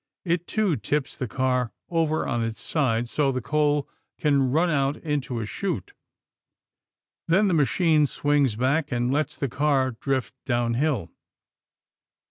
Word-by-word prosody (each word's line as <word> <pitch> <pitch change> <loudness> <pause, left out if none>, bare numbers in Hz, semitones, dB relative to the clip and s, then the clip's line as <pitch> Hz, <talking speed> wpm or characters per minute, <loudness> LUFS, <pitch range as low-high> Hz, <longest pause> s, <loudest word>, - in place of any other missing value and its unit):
It, 170 0 0
too, 210 -8 +1
tips 135 +6 -2
the 125 - -3
car 125 0 0 0.2
over 160 -2 +1
on 120 -2 0
its 115 -1 -4
side 120 -6 0
so 140 +3 +1
the 130 - -2
coal 150 0 +1 0.3
can 140 -3 +2
run 170 +5 +2
out 140 -1 +1
into 145 -6 -2
a 110 - -3
chute. 200 - -4 1.3
Then 190 +5 +4
the 185 - +2
machine 155 +1 +3
swings 145 -5 +1
back 135 +6 0
and 120 +1 0
lets 150 +2 -1
the 140 - -1
car 135 0 +1
drift 130 +2 -2
downhill. 120 - 0
140 Hz, 140 wpm, -25 LUFS, 125-155 Hz, 1.3 s, Then